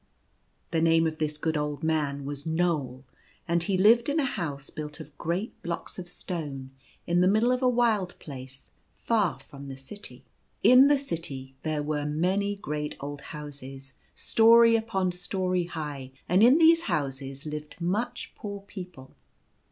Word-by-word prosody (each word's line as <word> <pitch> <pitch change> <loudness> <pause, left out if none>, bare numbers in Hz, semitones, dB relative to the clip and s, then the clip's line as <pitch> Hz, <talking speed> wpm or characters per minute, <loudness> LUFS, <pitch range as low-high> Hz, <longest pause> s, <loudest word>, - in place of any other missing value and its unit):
The 165 -1 +1
name 165 0 +4
of 155 -1 -2
this 150 -1 -1
good 160 +1 -1
old 150 0 -2
man 145 -3 0
was 145 0 -5
Knoal, 160 -6 -1 0.4
and 170 0 +2
he 185 +2 +1
lived 230 +7 +5
in 300 +3 +1
a 285 - +2
house 145 - -4
built 150 -1 -7
of 145 +1 -11
great 180 +7 -3
blocks 170 +2 -5
of 175 -1 -7
stone, 145 -8 -6 0.3
in 175 +1 +2
the 180 - +5
middle 220 +5 +3
of 250 0 +1
a 255 - +4
wild 225 -7 +1
place 135 -2 -10 0.2
far 210 -8 +1
from 140 0 -11
the 135 -1 -7
city. 135 +10 -9 0.4
In 255 +2 +8
the 290 0 +5
city 155 - -4
there 155 -2 -1
were 150 0 -1
many 190 +7 0
great 150 -6 -4
old 145 0 -6
houses, 135 -3 -8 0.2
storey 230 +1 +6
upon 195 -5 0
storey 180 0 -1
high; 145 -6 -6
and 180 +3 +4
in 250 +6 +7
these 330 +1 +6
houses 135 0 -3
lived 150 +1 -7
much 215 +8 -2
poor 200 -1 -6
people. 180 -9 -10
165 Hz, 160 wpm, -27 LUFS, 145-200 Hz, 0.4 s, In